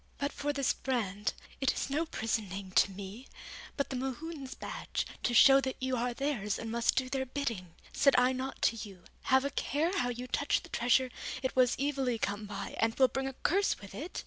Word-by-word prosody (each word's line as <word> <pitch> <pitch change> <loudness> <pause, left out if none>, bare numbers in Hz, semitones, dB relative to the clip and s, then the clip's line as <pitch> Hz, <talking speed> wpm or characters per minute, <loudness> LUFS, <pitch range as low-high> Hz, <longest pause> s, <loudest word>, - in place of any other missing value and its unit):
But 285 0 -1
for 290 +1 -1
this 275 -2 +1
brand, 210 -6 -1 0.3
it 270 -2 +2
is - - -2
no 320 +4 0
prison 220 -6 -2
name 190 0 -6
to 195 - +5
me, 200 +6 -8 0.5
but 280 - -1
the - - -2
Mohunes' 270 +2 -4
badge, - - -4 0.2
to 240 - 0
show 270 +3 +8
that 265 -1 -2
you 260 0 0
are 245 +1 0
theirs 240 -6 -1
and 225 -1 -5
must 235 0 +2
do 260 +1 +1
their 265 0 -1
bidding. 230 - -3 0.2
Said 275 - +4
I 250 +1 +5
not 260 +1 -4
to 230 - +4
you, 195 -4 -9 0.2
Have 265 +1 +4
a 280 - -1
care 320 +8 0
how 245 -10 +1
you 245 +1 -4
touch 285 +3 0
the - - -12
treasure, 250 +2 +2 0.3
it 260 - -1
was 255 -1 +4
evilly 270 -4 0
come 205 0 -2
by 200 -1 -5
and 225 0 +2
will 260 -1 +5
bring 270 0 -2
a 270 - -4
curse 390 +9 +1
with 200 -2 -11
it? 300 - -5
255 Hz, 215 wpm, -32 LUFS, 225-275 Hz, 0.5 s, show